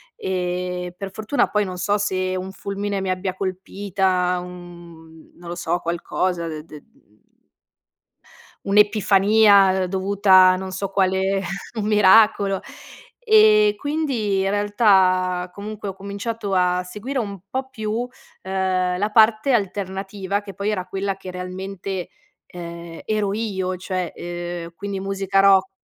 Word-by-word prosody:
e 180 -1 -3
per 195 -1 -6
fortuna 220 +7 0
poi, 210 0 +1
non 185 -2 -5
so 205 +3 0
se 185 -2 -1
un 185 +1 -4
fulmine 200 +1 -4
mi 190 -1 -1
abbia 185 0 -3
colpita, 185 -1 -1
uhm, 170 -2 -13
non 170 0 -11
lo 175 - -4
so, 175 0 -1
qualcosa 170 0 -2
de 155 -1 -6
de 150 -3 -12
mhmm 105 +1 -31 1.5
Un'epifania 200 -1 +4
dovuta 190 0 +5
a - - +1
non 190 0 -5
so 190 +1 -3
quale 190 0 +1 0.4
un 210 - -1
miracolo. 205 -1 +5 0.6
E 430 -2 +5
quindi 245 -11 -1
realtà 190 -3 +2
comunque 205 +1 -7
ho - - -5
cominciato 200 +1 -5
a 180 0 +2
seguire 210 +9 -6
un 200 -4 -4
po' 265 0 -3
più, 225 0 -3 0.3
ehm, 185 -1 -1
la 210 +1 0
parte 220 +3 +4
alternativa, 195 -1 -2
che 200 -1 -10
poi 200 +3 -2
era 185 -4 -2
quella 195 0 -3
che 185 -1 -8
realmente, 185 0 -5 0.4
ehm, 170 -1 -9
ero 210 -2 0
io, 190 -4 -2
cioè, 185 -2 -3
ehm, 175 -1 -6
quindi 200 0 -5
musica 195 0 -1
rock 195 -1 +5
190 Hz, 130 wpm, -22 LUFS, 180-205 Hz, 1.5 s, dovuta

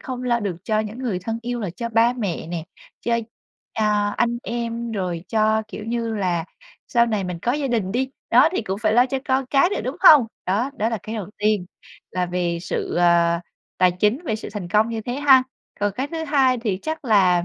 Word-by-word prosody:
không 255 -1 -6
lo 240 -1 +1
được 195 -5 -3
cho 215 -1 +1
những 215 +3 -6
người 230 -8 -2
thân 225 +5 -4
yêu 245 0 -3
là 200 - -3
cho 235 +7 -5
ba 230 +1 +3
mẹ 200 -10 -3
nè, 165 -2 -4 0.4
cho, 235 0 0 0.5
à, 210 -1 +1
anh 235 0 +1
em, 235 0 -3
rồi 180 -4 -3
cho, 220 0 +2
kiểu 215 - -7
như 230 -1 -2
là, 175 -4 0 0.4
sau 235 -2 +3
này 210 -4 -1
mình 180 -1 -4
có 245 - +1
gia 285 0 -1
đình 210 -5 -1
đi, 260 +2 -1 0.2
đó, - - +6
thì 370 - -1
cũng 195 -1 -3
phải 215 -1 +3
lo 245 +2 +5
cho 270 +1 -2
con 260 0 +1
cái 275 +6 +3
nữa, - - -1
đúng 260 +6 -3
không? 300 -10 +8 0.2
Đó, 215 +9 0
đó 215 - +1
là 225 -2 -2
cái 220 - -6
đầu 210 -5 -4
tiên 210 -3 +1 0.4
là 180 -1 -1
về 175 -1 -1
sự, - - -3
à, 170 -1 +3 0.4
tài 180 -1 +4
chính, 210 - +1
về 220 -6 -1
sự - - -7
thành 200 -4 -5
công 215 +4 +3
như 225 - -3
thế 245 +3 -4
ha. 270 -2 +6 0.4
Còn 205 -1 +1
cái 265 +3 -2
thứ 320 +1 -4
hai 270 -4 +3
thì 210 -5 -2
chắc 315 -2 -4
là 185 -6 +4
220 Hz, 225 wpm, -22 LUFS, 190-245 Hz, 0.5 s, không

